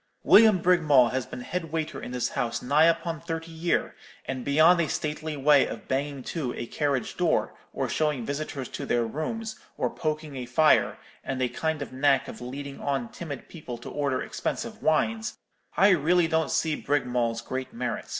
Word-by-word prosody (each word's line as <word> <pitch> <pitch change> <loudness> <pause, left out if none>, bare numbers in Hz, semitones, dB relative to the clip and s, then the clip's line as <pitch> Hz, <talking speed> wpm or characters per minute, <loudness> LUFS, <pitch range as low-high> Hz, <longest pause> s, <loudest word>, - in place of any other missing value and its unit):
William 215 -2 +7
Brigmawl 155 -8 +4
has 130 -3 -2
been - - -7
head 165 +4 -4
waiter 160 -1 -3
in - - -6
this 125 -1 -1
house 120 -4 -2
nigh 145 +5 +4
upon 165 -1 +1
thirty 165 0 -5
year; 165 +2 0 0.3
and 130 -2 -4
beyond 160 +6 +5
a 155 - -1
stately 155 0 -3
way 140 0 +5
of - - -8
banging 140 0 -2
to 135 -6 -3
a 120 - -4
carriage 140 0 -1
door, - - +1 0.2
or - - -2
showing 150 -6 0
visitors 140 -2 -4
to - - -6
their 120 -1 +2
rooms, 220 - -4 0.2
or - - 0
poking 155 -2 -3
a 125 -1 -5
fire, 155 +5 +4 0.3
and 135 -1 -3
a 130 - +2
kind 160 0 -2
of 135 - -11
knack 135 0 +2
of - - -9
leading 135 +3 -7
on 135 -4 -1
timid 145 -6 -7
people 140 -8 -8
to 120 - -9
order 140 -3 -1
expensive - - -4
wines, 220 +8 +1 0.4
I 200 - +6
really 175 0 +4
don't 160 -1 +1
see 160 -2 +1
Brigmawl's 125 -6 0
great 130 +4 -4
merit. 230 - -4
150 Hz, 180 wpm, -27 LUFS, 130-165 Hz, 0.4 s, William